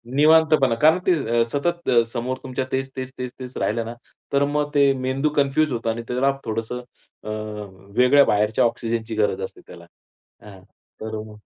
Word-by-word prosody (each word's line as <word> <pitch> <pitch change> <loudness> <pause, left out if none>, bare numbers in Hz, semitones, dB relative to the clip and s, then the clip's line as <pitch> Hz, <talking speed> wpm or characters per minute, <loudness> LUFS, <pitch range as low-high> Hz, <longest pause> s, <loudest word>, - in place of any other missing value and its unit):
निवांतपणा, 155 -4 +5
कारण 160 +4 +6
ते 185 - +6 0.3
अ, 115 - +5
सतत 170 +4 -1
अ, 120 -2 +5
समोर 130 +1 -2
तुमच्या 130 0 -3
तेच-तेच, 130 -1 -3
तेच-तेच 125 0 -7
राहिलं 115 +1 -1
ना 115 - -6 0.4
तर 140 0 +3
मग 150 0 0
ते 140 -1 +5
मेंदू 135 +3 +1
कन्फ्यूज 140 +2 +2
होतं 115 -1 -2
आणि 115 +1 -5
त्याला 130 +3 +2
थोडंसं 115 +2 -3 0.4
अ, 110 - -7 0.7
वेगळ्या 135 +3 +6
बाहेरच्या 105 +2 +2
ऑक्सिजनची 115 -1 -2
गरज 105 -3 0
असते 95 - -7
त्याला. 85 -1 -12 0.6
हां. 100 -3 -13 0.4
तर 110 0 -5
मग 105 -1 -13
125 Hz, 160 wpm, -23 LUFS, 115-140 Hz, 0.7 s, कारण